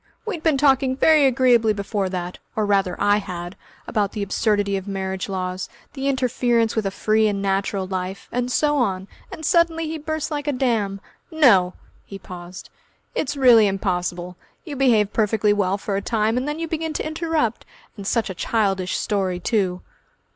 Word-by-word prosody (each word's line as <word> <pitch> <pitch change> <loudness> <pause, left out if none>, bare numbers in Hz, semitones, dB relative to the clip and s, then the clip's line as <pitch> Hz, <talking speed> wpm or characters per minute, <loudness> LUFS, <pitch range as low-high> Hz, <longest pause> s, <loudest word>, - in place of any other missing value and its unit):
We'd 420 -8 -4
been 315 -4 +2
talking 265 -2 +3
very 305 -1 +5
agreeably 245 -4 +3
before 200 -1 -2
that, 180 -1 -5 0.2
or 215 - +1
rather 195 -3 +1
I 205 0 +3
had, 175 -3 -6 0.3
about 205 -3 -1
the 210 - -2
absurdity 205 0 0
of 190 0 -4
marriage 190 -1 -3
laws, 185 -1 -3 0.2
the 275 -1 -3
interference 245 -3 +1
with 220 -3 0
a - - +1
free 215 +2 +2
and 205 -1 -1
natural 195 0 -1
life, 185 +1 -5
and 245 +1 -1
so 295 +2 +2
on, 195 -7 -1 0.2
and 315 - -7
suddenly 335 -1 +2
he 320 0 -4
burst 315 +1 -3
like 290 -1 -3
a - - +2
dam. 225 -7 0 0.3
No!" 230 - +4 0.3
He 195 - -9
paused. 180 -1 -10 0.4
"It's 285 0 -2
really 240 -5 +6
impossible. 180 -2 -2 0.3
You 300 -4 -6
behave 230 -6 +3
perfectly 210 -1 +2
well 200 -1 0
for 205 -1 -3
a 200 - -1
time, 220 0 0
and 255 +3 -1
then 295 +1 -2
you 330 0 -3
begin 320 0 -3
to - - -3
interrupt.... 315 -7 -1 0.3
And 200 -3 -7
such 225 -3 0
a - - -5
childish 195 0 0
story, 190 -3 -1
too!" 185 -2 -1
210 Hz, 175 wpm, -22 LUFS, 195-265 Hz, 0.4 s, really